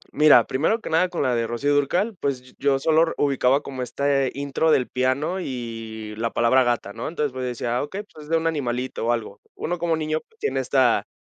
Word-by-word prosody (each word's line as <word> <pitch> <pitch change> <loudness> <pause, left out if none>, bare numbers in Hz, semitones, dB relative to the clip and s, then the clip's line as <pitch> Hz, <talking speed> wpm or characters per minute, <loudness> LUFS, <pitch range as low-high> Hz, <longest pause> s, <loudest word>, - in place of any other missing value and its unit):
Mira, 150 0 +7
primero 145 - 0
que 220 - -7
nada, 175 +3 +3
con 175 - -2
la 130 -2 +1
de 115 -1 0
Rocío 140 +5 0
Dúrcal, 175 +10 +1
pues, 130 -2 -3
yo 140 -1 +2
solo 155 +3 +3
r 165 0 +2
ubicaba 140 0 +2
como 130 -2 -6
este 135 +1 0
intro 140 +3 0
del 130 -5 +3
piano 130 +8 0
y 115 -5 -6
la 115 +1 -1
palabra 125 +3 +3
gata, 120 -4 -1
¿no? 115 +2 -5
Entonces, 150 -4 -2
pues, 130 0 -4
decía: 120 0 -2
"Okey, 190 +8 -5 0.2
es 150 - -12
de 165 - +3
un 165 - -3
animalito 130 -6 -2
o - - +3
algo". 115 -2 -3
Uno 175 - -3
como 165 -1 +1
niño 155 0 -1 0.2
tiene 435 - -1
esta, - - +2
140 Hz, 210 wpm, -23 LUFS, 125-155 Hz, 0.2 s, Mira